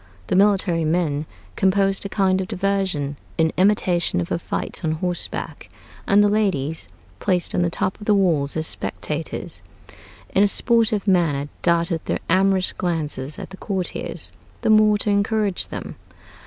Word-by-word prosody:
The - - -1
military 190 -4 +3
men 155 -2 0 0.3
composed 195 0 +2
a 200 - -5
kind 190 -1 +2
of 185 - -4
diversion 185 -8 -1 0.2
in 160 -1 +3
imitation 185 - +2
of 85 - -4
a - - 0
fight 175 - -4
on 155 -1 +1
horseback; 175 +2 -4 0.4
and 205 +1 +5
the - - +5
ladies, 165 - 0 0.3
placed 180 -2 0
on - - +1
the 175 - +2
top 185 +3 -2
of 210 - -9
the 210 - +5
walls 160 -7 +2
as 160 - -1
spectators, - - -4 0.7
in 195 - +4
a 205 - +6
sportive 225 -1 +1
manner 155 -7 +2
darted 170 -1 +1
their - - 0
amorous 190 +1 +3
glances 150 -5 -3
at - - -8
the 190 - -9
courtiers, 190 -4 -4 0.3
the - - +2
more 215 -1 +5
to 205 0 0
encourage 200 -1 0
them. - - -6
185 Hz, 155 wpm, -22 LUFS, 165-200 Hz, 0.7 s, a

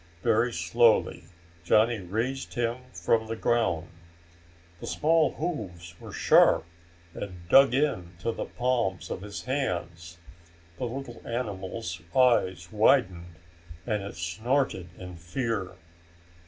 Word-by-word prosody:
Very 115 +3 +3
slowly 110 0 +2 0.4
Johnny 110 +5 +3
raised 115 +9 -3
him 120 0 0
from 110 -2 0
the 115 - -3
ground. 110 -8 0 0.9
The - - -7
small 160 +1 +2
hooves 95 - -5
were - - -9
sharp - - +4 0.5
and 90 -4 -8
dug 135 +1 +7
into 90 - -1
the - - -4
palms 120 -7 -1
of - - -4
his 100 0 -7
hands. 85 -10 -3 0.6
The - - -3
little 120 -1 -7
animal's 100 -6 -4
eyes 95 -9 +3
widened 95 -7 +2 0.5
and 105 -2 -1
it 100 +1 -7
snorted 95 +3 -1
in 90 -2 -9
fear. 95 +1 -3
110 Hz, 115 wpm, -27 LUFS, 90-120 Hz, 0.9 s, dug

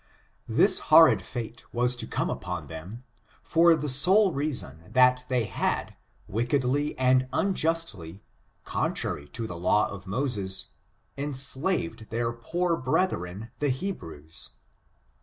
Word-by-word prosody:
This - - +4
horrid - - +7
fate 120 0 -7
was 125 +1 +2
to - - -1
come - - -2
upon - - -5
them, 90 +10 -9 0.4
for 165 0 +4
the 150 -1 -4
sole 185 +10 +5
reason, 135 - -3
that 125 0 +4
they 125 -2 +1
had, - - -2 0.3
wickedly 130 +6 -1
and 130 0 +3
unjustly, 160 - -1 0.4
contrary 70 0 -2
to 115 +7 -5
the 90 -6 -6
law 95 +4 +2
of 100 -1 -9
Moses, 100 -4 +1 0.5
enslaved 135 - -2
their 115 +1 -2
poor 170 +9 -1
brethren, 115 - -2
the 145 - +1
Hebrews. 80 - -5
125 Hz, 120 wpm, -27 LUFS, 100-150 Hz, 0.5 s, horrid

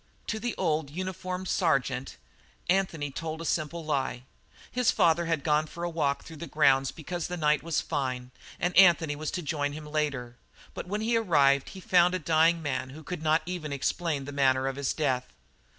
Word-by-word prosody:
To 220 - -3
the 240 +1 -3
old, 155 -5 0
uniformed 185 +2 -4
sergeant, 135 - 0 0.5
Anthony 175 -6 0
told 160 +2 -5
a 165 - -6
simple 165 +1 -2
lie. 135 -4 -1 0.5
His 250 -1 +2
father 170 0 +3
had 165 -4 0
gone 155 0 +2
for 170 +2 -8
a 175 - -1
walk 145 -4 0
through 160 - -11
the 170 - -7
grounds 135 -2 +3
because 175 +1 -5
the 180 - -4
night 150 -2 +2
was 165 -2 -1
fine, 130 -2 -3 0.3
and 175 0 -1
Anthony 170 -5 +6
was 155 +1 -4
to 180 - -4
join 145 -1 -1
him 155 +1 -7
there 150 0 -11
later, 135 -6 -2 0.4
but - - -6
when 210 +3 -2
he 230 +2 +1
arrived 140 -10 +3
he 190 - -10
found 180 0 +4
a - - +2
dying 165 0 +3
man 130 -3 -2
who 155 +4 -11
could 180 -1 -5
not 155 +1 +2
even 175 -4 -4
explain 140 +1 -1
the 145 - -6
manner 135 -2 +2
of 135 0 -1
his 140 -1 -1
death. 130 -5 -1
155 Hz, 200 wpm, -28 LUFS, 140-175 Hz, 0.5 s, Anthony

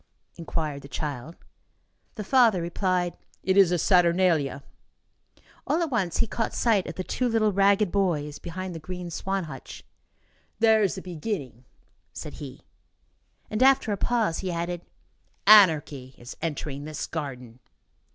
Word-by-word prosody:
inquired 155 -4 -4
the 140 - -11
child. 145 +1 -5 0.8
The 215 - -5
father 230 -4 +4
replied: 175 +1 -1 0.3
"It 190 - +1
is 195 -3 +6
the 175 - +1
Saturnalia." 170 -6 +2 1.0
All 335 +3 +1
at 320 - -3
once, 190 -8 0
he - - +2
caught 225 +1 -3
sight 215 -6 +2
of - - -6
the 185 - -4
two 250 +6 -1
little 220 -2 +2
ragged 200 0 +3
boys 155 -7 -1
behind 185 +1 -6
the 165 - -6
green 180 +2 -7
swan 195 +3 -2
hutch. 135 -5 -9 0.7
"There 220 -1 +4
is 195 -4 +1
the 190 - -7
beginning," 155 - -5 0.5
said - - -7
he. - - -9 0.8
And, 215 - -3
after 265 -4 +4
a - - +1
pause, 225 -6 0
he 185 -2 -3
added: 170 0 -3 0.6
"Anarchy 155 -10 +5
is 120 +1 -10
entering 145 -3 -4
this 155 -1 -4
garden." 125 -6 -6
180 Hz, 145 wpm, -26 LUFS, 155-205 Hz, 1.0 s, is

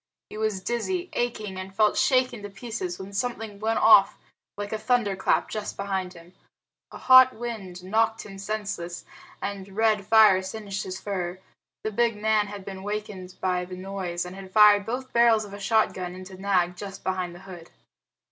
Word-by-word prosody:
He - - -7
was 215 -3 -1
dizzy, 350 - -2
aching, 215 -5 -3
and 190 +1 -8
felt 210 +1 +3
shaken 255 -4 +2
to 205 - -7
pieces 195 -4 -5
when 195 +1 -9
something 220 -1 -3
went 220 +1 0
off 210 -3 +6 0.4
like 205 +1 -5
a 215 - -2
thunderclap 215 -6 +1
just 210 -1 -5
behind 190 -2 -3
him. 170 +1 -15 0.6
A - - -10
hot 255 0 +7
wind 210 -6 -6
knocked 225 +3 0
him 195 -2 -10
senseless 195 -4 -4 0.4
and 200 -1 -6
red 215 -3 +2
fire 215 -4 +6
singed 195 0 -5
his 185 0 -5
fur. 185 -3 -4 0.5
The 215 - -2
big 230 0 +1
man 215 -1 +2
had 200 -2 -8
been 190 -1 -7
wakened 200 -2 -5
by 180 -1 0
the 180 0 -8
noise, 185 -2 -4
and 180 +1 -8
had 195 -1 -10
fired 210 0 +6
both 255 +3 -4
barrels 235 -2 +4
of 200 - -11
a 200 - -8
shotgun 195 -4 0
into 185 0 -10
Nag 185 -2 +1
just 195 +1 -8
behind 185 -2 -2
the 175 - -12
hood. 175 -3 -11
200 Hz, 175 wpm, -26 LUFS, 185-220 Hz, 0.6 s, hot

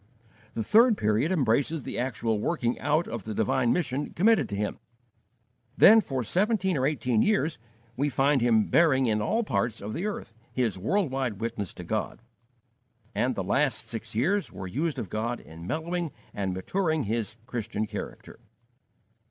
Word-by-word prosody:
The 115 - -1
third 225 - +5
period 110 - +1
embraces 140 0 +1
the - - -4
actual 115 -3 -1
working 120 -2 -1
out 155 +4 +1
of 115 -3 -5
the 110 +1 -5
divine 120 +3 +2
mission 145 -5 -1
committed 195 - +3
to 100 - -3
him. 105 +1 -3 1.0
Then 220 +3 +8
for 130 - -3
seventeen 190 - +1
or 130 -1 +2
eighteen 125 -6 +1
years 165 - +1 0.4
we 145 +3 0
find 135 0 +2
him 115 -3 +4
bearing 140 -6 +4
in 110 -2 +1
all 225 - +1
parts 115 - -1
of 105 +2 -6
the 185 - -2
earth 205 - -5 0.2
his 120 -6 0
world 145 - 0
wide 130 -6 -2
witness 110 -4 -3
to 90 - -8
God; 110 +4 -3 0.9
and 125 0 0
the 95 - -2
last 115 +1 0
six 115 -2 -6
years 185 - +1
were 95 - -7
used 145 - -2
of 105 - -4
God 115 +5 -2
in 85 +2 -11
mellowing 165 - -2 0.2
and 95 -2 -2
maturing 160 - -1
his 110 -1 -2
Christian 115 -2 -3
character. 110 - -8
125 Hz, 165 wpm, -27 LUFS, 110-160 Hz, 1.0 s, Then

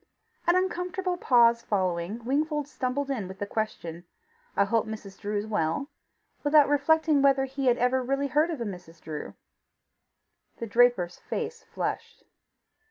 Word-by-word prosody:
An 345 - +5
uncomfortable 365 0 -1
pause 235 -7 +4
following, 190 +2 -2
Wingfold 295 +2 0
stumbled 275 0 -2
in 220 -8 -2
with 190 +1 -9
the 205 - -3
question, 175 -6 -4 0.5
"I 200 - +4
hope 225 +2 +1
Mrs. 210 -3 -8
Drew 205 0 -2
is 205 - -2
well," 210 - -1 0.5
without 295 -1 +6
reflecting 300 +1 +3
whether 275 -1 +4
he 270 0 -3
had 245 -1 +4
really 260 +2 +1
ever 280 - -5
heard 305 +3 +3
of 320 -5 -3
a 235 - -2
Mrs. 175 -4 -8
Drew. 155 -2 -7 1.2
The 230 - -4
draper's 225 -6 +3
face 465 0 -4
flushed. - - -4
245 Hz, 150 wpm, -27 LUFS, 205-290 Hz, 1.2 s, without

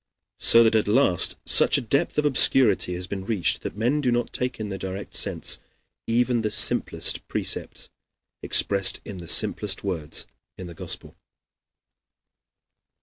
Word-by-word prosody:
So 115 0 +6
that 110 - +2
at 110 -2 +1
last 105 -5 +2
such - - +4
a - - 0
depth - - -2
of 150 - +1
obscurity 125 -9 +2
has 90 +1 -4
been 95 0 -7
reached 95 -4 -1
that - - -7
men 125 +7 0
do 125 -3 0
not 120 0 -2
take 125 -1 -4
in 105 -1 -5
their 95 -1 -6
direct 95 +1 -6
sense - - 0 0.5
even 120 +1 0
the 110 - -2
simplest - - +1
precepts, - - -4 0.5
expressed 100 -1 +2
in 95 -3 -9
the 85 - -11
simplest 100 +3 +2
words, 85 -7 -4 0.3
in 90 - -9
the 85 - -10
Gospel. 80 - -5
105 Hz, 150 wpm, -23 LUFS, 95-120 Hz, 0.5 s, So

